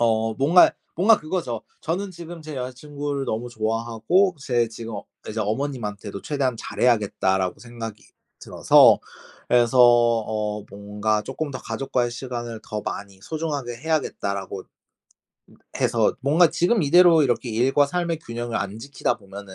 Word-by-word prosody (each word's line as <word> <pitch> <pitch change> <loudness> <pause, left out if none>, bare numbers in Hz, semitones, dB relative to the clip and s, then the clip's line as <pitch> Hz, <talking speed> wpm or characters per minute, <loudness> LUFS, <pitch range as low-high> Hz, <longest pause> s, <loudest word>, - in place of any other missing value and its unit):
어 110 -1 +1
뭔가 160 +8 +5 0.2
뭔가 205 +6 +5
그거죠. 155 - -3 0.2
저는 190 +5 -3
지금 170 -1 -10
제 155 -2 -7
여자 125 0 -4
친구를 145 +1 -4
너무 115 +1 -3
좋아하고 115 - 0
제 120 -4 +1
지금 115 0 -8 0.3
이제 110 +1 -3
'어머님한테도 105 -3 -3
최대한 135 -5 -1
잘해야겠다.'라고 100 -5 0
생각이 115 -3 -8 0.4
들어서 - - +5 0.5
그래서 120 +1 +3
어 115 -3 +3
뭔가 105 +2 -2
쪼끔 145 +5 -4
더 130 - -5
'가족과의 120 +1 -2
시간을 120 -2 -6
더 105 - -4
많이 100 -1 -6
소중하게 145 -6 -4
해야겠다.'라고 100 -10 -2 1.2
해서 - - +2
뭔가 155 +6 +4
지금 190 +4 +2
이대로 170 +2 +6
이렇게 125 -2 0
일과 130 +6 +3
삶의 170 +1 -2
균형을 120 -4 -4
안 100 +2 -4
지키다 140 +5 -2
보면은 100 -1 -11
120 Hz, 325 characters per minute, -23 LUFS, 110-145 Hz, 1.2 s, 이대로